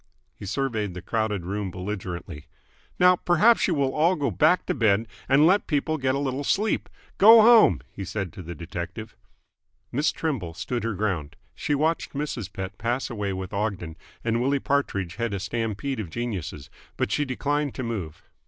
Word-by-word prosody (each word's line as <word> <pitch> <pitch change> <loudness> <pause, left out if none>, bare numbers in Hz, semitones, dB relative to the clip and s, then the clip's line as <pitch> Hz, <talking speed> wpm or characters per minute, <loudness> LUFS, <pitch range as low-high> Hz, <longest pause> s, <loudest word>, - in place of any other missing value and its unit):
He 100 - -9
surveyed 110 -4 -2
the 90 - -6
crowded 105 -5 -1
room 100 +1 -3
belligerently. 90 -4 -6 0.5
"Now 180 0 +6
perhaps 180 +9 +4
you 175 - +1
will 135 -2 +1
all 165 +4 +3
go 140 -6 -1
back 140 - +3
to - - 0
bed 110 -3 +2 0.2
and 140 +3 +6
let 190 +5 +3
people 155 +1 0
get 130 0 +1
a - - 0
little 140 0 -2
sleep. 210 +9 0 0.3
Go 220 +2 +9
home!" 220 - +6
he 100 - -6
said 95 -1 -4
to 100 - -8
the 85 0 -7
detective. 90 +6 -7 0.8
Miss 145 +5 +1
Trimble 115 - -3
stood 105 +7 -3
her 115 -2 -2
ground. 90 -8 -2 0.2
She 150 -2 -1
watched 160 +3 0
Mrs. 135 -9 -4
Pett 95 0 -6
pass 120 +4 -1
away 105 -4 -2
with 95 +1 -5
Ogden, 100 -6 -2 0.3
and 115 0 0
Willie 140 +3 +2
Partridge 120 - -1
head 115 -3 -1
a - - -3
stampede 115 +5 -3
of 100 -6 -4
geniuses, 95 - -5 0.3
but - - -1
she 145 - +1
declined 145 +1 -1
to 130 - -4
move. 100 -10 -5
115 Hz, 180 wpm, -25 LUFS, 95-140 Hz, 0.8 s, Go